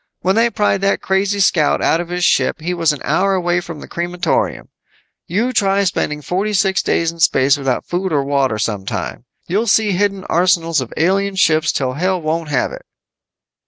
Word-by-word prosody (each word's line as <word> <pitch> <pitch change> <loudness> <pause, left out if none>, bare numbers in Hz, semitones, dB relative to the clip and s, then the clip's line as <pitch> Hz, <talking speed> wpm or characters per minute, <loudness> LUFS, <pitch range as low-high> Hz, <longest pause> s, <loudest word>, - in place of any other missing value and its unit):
When 185 +2 +1
they 230 +1 +3
pried 205 -3 0
that 195 0 0
crazy 195 +1 0
scout 165 -6 +2
out 165 - +1
of 175 - -8
his 180 0 -1
ship, - - +2
he 175 +3 -3
was 165 -3 +2
an 150 - -6
hour 195 +1 +1
away 175 -1 0
from 165 -3 -9
the - - -10
crematorium. 175 +1 -2 0.6
You 225 +9 -1
try 200 -2 +2
spending 150 -5 -2
forty 195 +6 -2
six 195 -1 +2
days 165 -1 0
in 170 - -15
space 135 -3 +3
without 135 -3 -2
food 180 +1 -2
or 145 -3 +1
water 135 -5 0
sometime! 105 -3 -4 0.2
You'll 210 +6 -1
see 215 0 +3
hidden 195 0 0
arsenals 170 -3 +1
of 125 - -7
alien 195 +4 +1
ships 160 -3 +2
till 130 -2 -2
hell 185 +5 0
won't 160 0 -2
have 140 -4 0
it." - - -8
175 Hz, 190 wpm, -17 LUFS, 155-195 Hz, 0.6 s, they